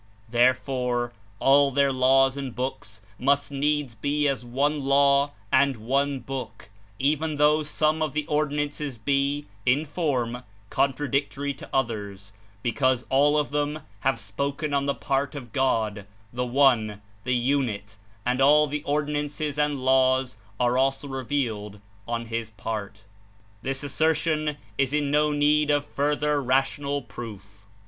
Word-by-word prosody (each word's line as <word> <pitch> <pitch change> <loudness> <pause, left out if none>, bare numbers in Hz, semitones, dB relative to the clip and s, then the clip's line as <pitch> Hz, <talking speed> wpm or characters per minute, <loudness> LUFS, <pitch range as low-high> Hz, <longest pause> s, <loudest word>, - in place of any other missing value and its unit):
There 120 +2 +4
fore, 125 -2 -2 0.3
all 140 +1 +5
their 140 0 +2
laws 135 +1 +4
and 135 -4 -5
books 110 -5 -5 0.2
must 140 +2 +2
needs 145 -2 0
be 145 +5 0
as 135 -3 -1
One 140 +5 0
Law 140 +1 +4 0.2
and 140 -3 +3
One 135 +5 0
Book, 130 -4 -7 0.3
even 150 +4 0
though 150 +1 +4
some 155 +1 0
of 155 -2 -1
the 150 0 -1
or 150 0 +1
dinances 145 -2 -3
be, 140 +4 0 0.2
in 135 +7 +2
form, 130 -7 -1 0.3
contradictory 140 +1 0
to - - -12
others; 100 -6 -3 0.3
because 130 +1 +1
all 145 +3 +4
of 150 -1 0
them 150 +1 -1 0.2
have 135 -3 0
spoken 140 +9 -3
on 140 0 +1
the 140 - +1
part 135 +1 -1
of 125 -5 -8
God, 110 -6 0 0.3
the 125 +1 -2
One, 120 -6 +3 0.2
the 125 0 0
Unit, 120 -6 -1 0.3
and 125 +2 +1
all 150 +2 +6
the 150 0 -3
Ordinances 150 0 -2
and 145 -3 0
Laws 130 -1 +3 0.2
are 125 +1 +2
also 135 +1 +1
revealed 120 -6 -3 0.3
on 115 0 -2
His 115 -1 -4
part. 105 0 -6 0.6
This 135 +1 -3
assertion 155 +1 0 0.2
is 135 0 +1
in 145 -1 +1
no 150 +1 +3
need 150 +1 +3
of 145 -1 +2
further 145 0 0
rational 140 +2 0
proof. 100 -4 -10
135 Hz, 140 wpm, -25 LUFS, 125-145 Hz, 0.6 s, all